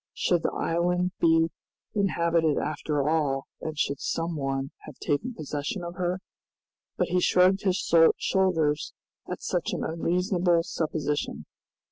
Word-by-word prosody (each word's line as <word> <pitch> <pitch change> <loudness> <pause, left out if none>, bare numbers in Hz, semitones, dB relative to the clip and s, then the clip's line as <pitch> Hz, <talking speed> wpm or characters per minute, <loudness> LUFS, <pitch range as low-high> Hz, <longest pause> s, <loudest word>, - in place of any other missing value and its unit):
Should 175 -2 +2
the - - 0
island 180 +2 0
be 165 0 +4 0.4
inhabited 170 -6 +2
after 150 -1 -1
all, 145 -4 +1 0.2
and 155 -1 -5
should 140 -2 0
some 165 0 -2
one 135 -1 -2 0.2
have 150 - -9
taken 225 - -1
possession 150 +4 -4
of 170 0 -5
her? 180 +1 -2 0.8
But - - 0
he 180 0 +2
shrugged 185 +2 +4
his 190 -2 +1 0.4
shoulders 160 -6 +1 0.4
at - - -5
such - - -1
an - - -2
unreasonable 175 +1 +1
supposition. 155 -4 -2
165 Hz, 130 wpm, -27 LUFS, 150-180 Hz, 0.8 s, be